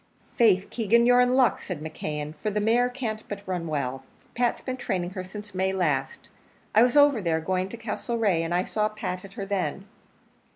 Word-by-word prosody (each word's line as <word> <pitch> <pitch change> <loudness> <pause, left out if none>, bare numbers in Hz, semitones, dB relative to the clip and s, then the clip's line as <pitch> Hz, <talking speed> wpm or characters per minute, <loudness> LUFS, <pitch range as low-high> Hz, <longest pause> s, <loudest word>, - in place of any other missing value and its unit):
"Faith, 200 -6 +3
Keegan, 230 +1 +3
you're 245 0 +6
in 250 +1 +3
luck," 260 -2 +3
said 180 -5 -5
McKeon, 150 -1 -5
"for 215 - 0
the 210 0 -1
mare 235 +4 +3
can't 230 -4 -4
but 200 -1 -7
run 180 -3 -2
well. 135 -4 -2 0.3
Pat's 240 0 +1
been 255 - -4
training 180 -7 -2
her 185 -1 -5
since 210 +3 -9
May 190 +1 0
last. 150 -8 -1 0.5
I 215 - +6
was 245 +3 +4
over 285 -5 +6
there 165 -3 +1
going 185 +3 -1
to 235 - -8
Castlereagh, 225 -4 -1
and 165 - -4
I 175 +1 +2
saw 215 +1 0
Pat 190 -4 -5
at 195 0 -12
her 200 - -5
then." 195 -1 -2
200 Hz, 200 wpm, -26 LUFS, 180-230 Hz, 0.5 s, you're